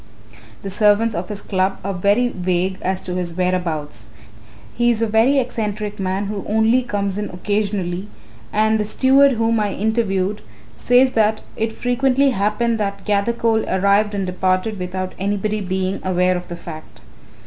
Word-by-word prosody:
The 195 - -5
servants 210 +3 +3
of 175 0 -4
his 210 -1 -6
Club 190 0 0
are 200 +1 -2
very 205 +7 +2
vague 185 -1 -1
as 190 0 -1
to 180 - -5
his 175 -2 -3
whereabouts. 165 - -2 0.7
He 240 0 +2
is 235 -2 +1
a - - +4
very 225 +6 +3
eccentric 215 -5 -2
man, 190 +1 -1
who 200 -1 -4
only 220 +4 +3
comes 200 -4 -2
in 210 - -3
occasionally, 195 -1 -2 0.4
and 220 +1 +2
the - - +1
steward 270 +5 +4
whom 225 -1 +1
I 205 -2 -1
interviewed 205 -2 0 0.3
says 250 - +4
that 220 -1 +1
it 225 0 -1
frequently 265 +4 +1
happened 225 +2 0
that 200 -1 -3
Gathercole 220 +2 +1
arrived 200 +2 +2
and 195 -1 -1
departed 185 +3 -1
without 185 +1 -4
anybody 205 +2 -1
being 190 0 -2
aware 185 0 +2
of 180 0 -5
the 175 - -6
fact. 155 -2 -10
205 Hz, 160 wpm, -20 LUFS, 185-220 Hz, 0.7 s, a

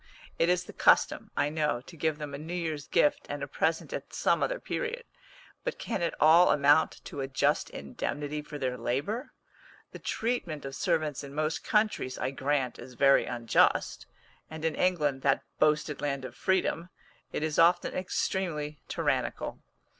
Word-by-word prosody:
It 165 - +3
is 180 0 +2
the - - -11
custom, - - +3
I 145 - +2
know, 150 -5 0
to 165 - -13
give 160 -1 0
them 150 -2 -6
a 140 - -5
new 165 +4 -5
year's 160 -4 -3
gift 295 - +2
and - - -4
a - - -3
present - - -1
at - - -6
some - - +2
other - - 0
period, 480 0 -3 0.6
but - - -3
can 230 - -3
it 170 - -1
all 165 +3 +7
amount 145 +2 +3
to 140 - -5
a 135 - -2
just 135 -1 +1
indemnity 145 - -4
for 150 0 -8
their 130 -3 -2
labour? 145 - -2 0.6
The - - -9
treatment 185 - -2
of 135 0 -6
servants 155 -5 0
in 140 0 -9
most 155 +1 -1
countries, 210 - +1
I 130 - -2
grant, 135 -2 -1
is 125 - -10
very 135 +2 +5
unjust, 120 -1 +1 0.4
and 160 0 -6
in 160 - +1
England, 150 -8 +1
that 135 0 +2 0.2
boasted 150 -1 +2
land 140 -2 -2
of - - -7
freedom, 180 -2 0 0.4
it - - -2
is 155 -1 0
often 175 +1 +4
extremely 170 -5 -2
tyrannical. - - -1
150 Hz, 170 wpm, -29 LUFS, 140-175 Hz, 0.6 s, all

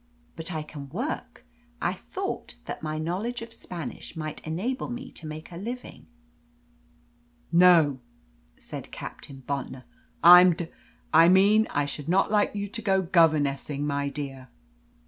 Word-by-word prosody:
But 165 +2 -5
I 155 -2 -3
can 145 -2 -9
work. 245 - -5 0.3
I 175 - 0
thought 180 - -6
that - - -6
my 155 0 -3
knowledge 195 +10 -3
of 230 0 -11
Spanish 170 - -8
might 155 -2 -5
enable 225 +14 -2
me 250 +2 -6
to 160 - -10
make 155 +3 -8
a 170 - -8
living." 240 +6 -7 1.4
"No," 170 -6 +6 0.6
said - - -8
Captain 135 -1 -9
Bontnor, 135 -2 -4 0.4
"I'm 180 +1 +10
d 165 0 -5 0.4
I 165 +2 +7
mean 205 +4 +5
I 145 0 0
should 145 +2 -6
not 190 +3 +3
like 210 -1 +2
you 205 0 -2
to 225 +3 -5
go 190 -2 +2
governessing, 150 -4 +2
my 140 -1 -1
dear." 135 -2 -6
165 Hz, 145 wpm, -27 LUFS, 145-195 Hz, 1.4 s, I'm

